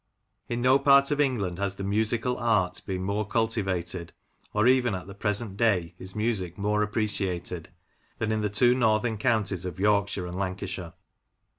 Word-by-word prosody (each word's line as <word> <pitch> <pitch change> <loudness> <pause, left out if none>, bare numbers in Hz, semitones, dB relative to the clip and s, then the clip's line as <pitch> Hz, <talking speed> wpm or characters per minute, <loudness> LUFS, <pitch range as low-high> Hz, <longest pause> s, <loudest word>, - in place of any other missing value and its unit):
In 120 0 -2
no 130 +2 +5
part 140 0 +5
of 145 0 +2
England 100 -11 0
has 100 -1 -1
the 100 - -6
musical 110 +5 +1
art 105 -7 +1
been 95 -1 -2
more 100 +3 -1
cultivated, 95 -6 -2 0.4
or 105 +1 +1
even 125 -4 +4
at 90 - -6
the 100 - -9
present 105 0 -3
day 100 -7 +1
is 95 0 -8
music 105 -6 -1
more 105 +1 +1
appreciated, 95 -5 -2 0.5
than 110 -1 -1
in 110 0 0
the 105 - 0
two 120 +4 +4
northern 110 -2 +1
counties 105 -6 +1
of 90 -2 -6
Yorkshire 100 -2 +1
and 90 +1 -5
Lancashire. 95 -2 -4
105 Hz, 165 wpm, -27 LUFS, 95-115 Hz, 0.5 s, no